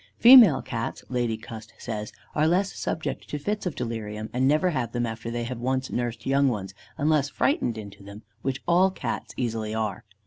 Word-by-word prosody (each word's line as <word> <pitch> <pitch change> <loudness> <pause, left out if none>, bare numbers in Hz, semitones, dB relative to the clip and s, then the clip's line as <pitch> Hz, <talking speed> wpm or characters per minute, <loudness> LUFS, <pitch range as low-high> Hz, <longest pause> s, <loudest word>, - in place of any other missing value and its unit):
Female 235 - +8
Cats, 115 -3 -4
Lady 120 -3 -1
Cust 110 0 -10
says, 105 -2 -5 0.2
are 155 +1 +2
less 190 +4 +1
subject 150 -4 -4
to 150 - -3
fits 205 +7 -2
of 170 - -4
delirium, 110 -2 -4
and 130 +2 +2
never 155 +6 +3
have 120 -6 -2
them 120 -1 0
after 115 0 -5
they 120 0 -3
have 120 0 -5
once 130 +2 -1
nursed 120 -2 -3
young 140 +1 +3
ones, 100 -6 -2 0.2
unless 150 -1 +2
frightened 125 - 0
into 100 -2 -9
them, 100 +2 -11 0.2
which 135 +1 -3
all 180 +2 +5
Cats 190 - -5
easily 110 -3 -2
are. 110 -2 -2
120 Hz, 185 wpm, -26 LUFS, 110-150 Hz, 0.2 s, Female